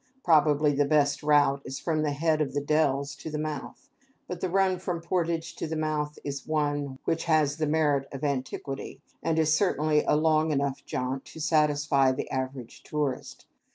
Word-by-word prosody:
Probably 150 -2 +4
the 145 0 +2
best 145 -1 +2
route 145 -2 +3
is 135 - -6
from 155 +1 -1
the 155 - +1
head 155 +2 +1
of 140 -2 -2
the - - +2
Dells 140 -1 +1
to - - -7
the 155 - -3
mouth; 150 -2 -5 0.4
but 180 -1 -6
the 185 - -1
run 190 0 +2
from 180 -2 -3
Portage 170 -1 -2
to - - -3
the 160 - -3
mouth 155 -1 -2
is 140 -1 -4
the - - -11
one 145 -3 -1
which 165 - -1
has 155 -3 +2
the 155 -1 0
merit 145 -3 +1
of 135 0 -7
antiquity, 135 -1 -3 0.2
and 165 -1 0
is 155 -1 +3
certainly 155 -4 +2
a - - +4
long 155 0 +3
enough 140 -2 -1
jaunt 130 +1 -3
to - - -11
satisfy 150 -3 +3
the 130 - -4
average 130 -2 -5
tourist. 145 -4 -4
150 Hz, 190 wpm, -27 LUFS, 140-155 Hz, 0.4 s, Probably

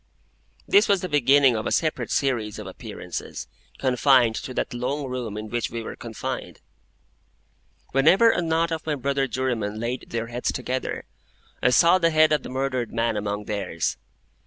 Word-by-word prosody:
This 405 +2 +5
was 200 -3 +3
the 185 - -3
beginning 140 -3 +4
of 110 0 -2
a - - -2
separate 155 -2 0
series 120 -7 0
of - - -7
appearances, - - -7 0.3
confined 130 -2 +4
to - - -6
that - - -2
long 135 +4 -2
room 125 -5 -4
in 110 0 -5
which 120 +1 -2
we 115 0 -5
were - - -6
confined. - - -6 1.3
Whenever 185 - +5
a 180 - 0
knot 165 0 +1
of 160 -1 -3
my 155 - +1
brother 140 0 0
jurymen 115 -6 -2
laid 120 +3 -3
their 115 0 -2
heads 120 +1 -2
together, 130 0 -3 0.6
I - - +4
saw 170 +8 +5
the 165 -2 +3
head 155 -1 +4
of 150 - +2
the - - -8
murdered 130 -3 -2
man 115 -1 0
among 105 0 -2
theirs. 100 -6 -2
130 Hz, 170 wpm, -24 LUFS, 115-150 Hz, 1.3 s, This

